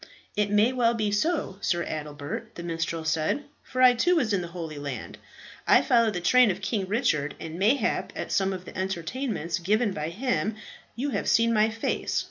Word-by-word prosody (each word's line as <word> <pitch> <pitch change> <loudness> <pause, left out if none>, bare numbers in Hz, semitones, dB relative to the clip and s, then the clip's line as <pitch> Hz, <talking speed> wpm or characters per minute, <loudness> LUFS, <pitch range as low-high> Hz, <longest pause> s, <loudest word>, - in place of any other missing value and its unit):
"It 210 -1 +1
may 210 +5 +3
well 235 -2 +2
be 215 -2 0
so, 250 - 0
Sir 175 -1 0
Adelbert," 150 -1 -6
the 170 - -7
minstrel 165 -1 -3
said, 160 - 0 0.2
"for 255 0 -1
I 250 -1 +8
too 355 +9 +2
was 245 -10 +1
in 195 - +1
the 175 - -5
Holy 165 -3 -6
Land. 140 -3 -6 0.5
I - - +6
followed 230 -5 +3
the 175 - -2
train 250 +5 +5
of 190 0 -1
King 200 -1 -2
Richard, 160 - 0
and 165 +1 -7
mayhap 225 +8 +1
at - - -5
some 195 -1 +2
of 185 -1 -6
the - - -11
entertainments 190 - -3
given 210 +5 +1
by 150 -1 -3
him 215 0 -1 0.4
you 275 +4 -2
have - - -1
seen 230 0 +4
my 215 0 +4
face. 225 0 -1
200 Hz, 195 wpm, -26 LUFS, 170-235 Hz, 0.5 s, I